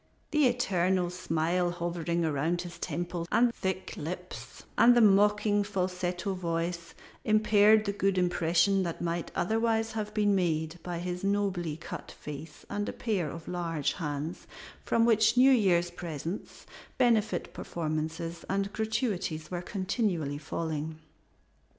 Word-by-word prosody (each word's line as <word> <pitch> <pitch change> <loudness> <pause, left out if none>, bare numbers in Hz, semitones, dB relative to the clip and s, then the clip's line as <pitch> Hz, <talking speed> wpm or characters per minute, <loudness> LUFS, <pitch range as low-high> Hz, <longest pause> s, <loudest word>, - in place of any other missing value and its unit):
The 300 -3 +4
eternal 185 -7 +1
smile 175 0 0
hovering 170 -1 -2
around 160 +4 0
his 170 -1 -9
temples 175 +1 -3
and 235 +2 +4
thick 190 -2 -3
lips, 180 +4 -7
and 240 +1 +6
the - - +6
mocking 205 0 +4
falsetto 185 -1 -2
voice, 170 -1 -3 0.3
impaired 215 0 +5
the 200 - 0
good 195 -1 +1
impression 180 +2 +2
that 170 -2 -3
might 170 0 -2
otherwise 225 +2 +1
have 215 -1 -3
been 205 -1 +3
made 165 -3 0
by 175 0 -4
his 180 +1 -4
nobly 195 -6 0
cut 170 -1 -8
face 150 +1 -9
and 205 0 -2
a - - -5
pair 195 -9 -1
of 165 +2 -9
large 165 -4 -1
hands, 150 -1 -4 0.4
from 230 0 +2
which 225 0 +4
New 260 +2 +7
Year's 180 -8 +3
presents, 170 +1 -6 0.3
benefit 220 -3 +2
performances, 165 +1 -4
and 195 +1 -1
gratuities 215 -8 -2
were 175 -1 -2
continually 185 - -1
falling. 155 0 -4
180 Hz, 130 wpm, -29 LUFS, 165-205 Hz, 0.4 s, New